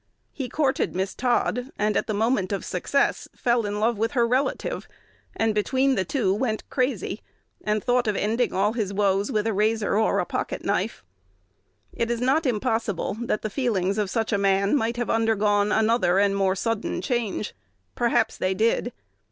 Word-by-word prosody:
He 265 -4 -5
courted 280 - 0
Miss 190 +1 -1
Todd, 250 0 0
and 210 0 +1
at - - 0
the 215 - -1
moment 215 -3 +1
of 200 -3 -2
success 275 +10 0
fell 235 -3 +1
in 205 0 -3
love 225 0 +1
with 225 +5 0
her 240 -3 +3
relative, 260 +3 -1 0.5
and, 225 -1 +1
between 260 +6 +2
the 190 - +1
two, 195 -1 0
went 220 0 -2
crazy, 255 +1 -1 0.4
and 210 0 0
thought 245 -1 +2
of 210 - +1
ending 230 +5 0
all 205 +3 +1
his 215 -5 -2
woes 200 0 +1
with 210 0 0
a 225 - +1
razor 215 +1 +1
or 220 +1 +2
a - - +1
pocket - - -4
knife. - - -1 0.9
It 235 - -1
is 235 -1 -1
not 270 +5 +2
impossible 225 -5 -1
that 235 -3 -1
the 215 - -3
feelings 200 -6 0
of 205 -2 0
such 225 +2 -1
a 200 - +2
man 195 +3 +2
might 235 -3 0
have 240 - -1
undergone 210 -2 +2
another 220 -4 +3
and 200 0 +3
more 195 -1 +2
sudden 225 +2 -2
change. 235 -5 -2 0.4
Perhaps 235 -2 +1
they 185 0 0
did. 230 +3 +1
220 Hz, 180 wpm, -25 LUFS, 205-240 Hz, 0.9 s, her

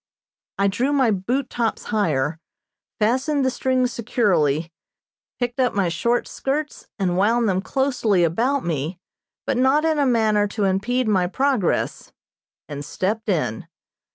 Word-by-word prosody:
I 200 - +2
drew 240 +8 0
my 260 -5 +3
boot 240 +8 -1
tops 235 -3 -2
higher, 160 -7 0 0.6
fastened 265 +6 +1
the 260 - +2
strings 255 -1 0
securely, 170 - +1 0.7
picked 245 0 -2
up 250 -4 +2
my 195 -4 +1
short 235 +8 0
skirts 295 +3 -3
and 180 -3 0
wound 230 +3 +3
them 190 -1 +1
closely 240 -7 +1
about 245 - +1
me, 165 +2 -3 0.5
but - - 0
not 265 +5 +3
in 315 -2 +1
a 280 - +3
manner 215 -4 +2
to 205 +1 -3
impede 215 +6 0
my 190 -4 +2
progress, 260 -2 0 0.6
and 145 0 -6
stepped 210 +9 -2
in. 150 - -1
220 Hz, 140 wpm, -22 LUFS, 185-255 Hz, 0.7 s, my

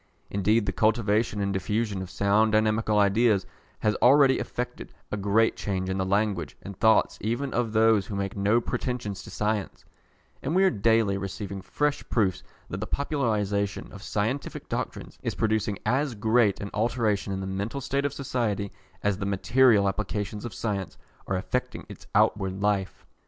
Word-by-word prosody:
Indeed 105 +3 +2
the 100 - 0
cultivation 110 +1 +1
and 100 0 0
diffusion 100 +1 -1
of 95 - -6
sound 100 +3 +2
dynamical 110 0 +2
ideas 105 0 +3 0.4
has 105 - +2
already 135 +1 +5
effected - - -5 0.2
a - - 0
great 105 +2 +2
change 95 -2 -2
in 95 - -2
the 95 - 0
language 100 -4 0
and 100 - -7
thoughts 110 +1 +3
even 120 +5 -2
of 120 -2 0
those 110 -2 +4
who 105 - -5
make 100 -1 -3
no 105 +4 +3
pretensions 115 -5 -3
to - - -11
science, 105 -1 -2 0.6
and 150 +6 -2
we 190 - +5
are 190 - +5
daily 110 -2 +2
receiving 100 0 -5
fresh 145 +8 -1
proofs 100 -6 +1 0.3
that 90 - -5
the 105 - -4
popularisation 105 -8 -1
of 100 - -10
scientific 115 +6 -3
doctrines - - -5
is - - -3
producing 110 -2 0
as 135 -1 +1
great 110 -1 +2
an 100 - -6
alteration 110 -3 0
in 95 - -2
the 95 - -4
mental 100 +7 -3
state 140 +1 -1
of 145 - 0
society 110 -7 -2 0.3
as 100 -1 +1
the 100 - -2
material 105 +1 +4
applications 105 +1 -3
of 120 - -6
science 100 -5 -3 0.3
are 95 - 0
effecting 90 - -3
in - - -14
its - - -12
outward 95 -1 +2
life. 100 -2 -1
105 Hz, 170 wpm, -27 LUFS, 100-115 Hz, 0.6 s, already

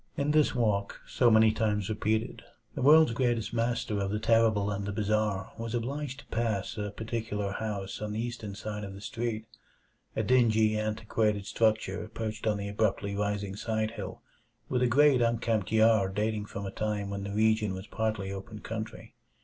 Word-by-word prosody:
In 145 +1 +1
this 155 -3 +3
walk, 105 -4 0
so 120 - +3
many 110 -1 +6
times 105 -3 0
repeated, 110 +1 -1 0.3
the - - -4
world's 155 +1 +7
greatest 120 -2 0
master 115 -3 0
of 100 0 -1
the 105 - -1
terrible 110 -2 +3
and 100 0 -3
the 100 - -3
bizarre 105 -2 0
was 115 +1 -3
obliged 135 +3 -3
to - - -22
pass 110 -3 -1
a 105 -1 -3
particular 110 -2 -3
house 100 -2 -4
on 105 0 -3
the 110 - -3
eastern 115 -4 -4
side 105 0 -5
of 95 -1 -7
the - - -9
street; 115 -1 -3 0.7
a - - 0
dingy, 110 -4 +4
antiquated 110 -1 0
structure 110 -2 0
perched 110 0 -3
on 105 -1 +2
the 100 0 -4
abruptly 100 -1 0
rising 100 -1 -2
side 110 +1 -1
hill, 115 - -7 0.5
with 125 -1 +1
a 125 - +4
great 140 +1 +5
unkempt 115 -3 +1
yard 110 -4 +4
dating 105 0 -1
from 100 0 -6
a 95 - -4
time 105 -1 -2
when 100 0 -4
the 100 - -4
region 110 -1 +2
was 95 +1 -7
partly 110 -4 -2
open 100 +2 -7
country. 110 +1 -6
110 Hz, 180 wpm, -29 LUFS, 105-115 Hz, 0.7 s, world's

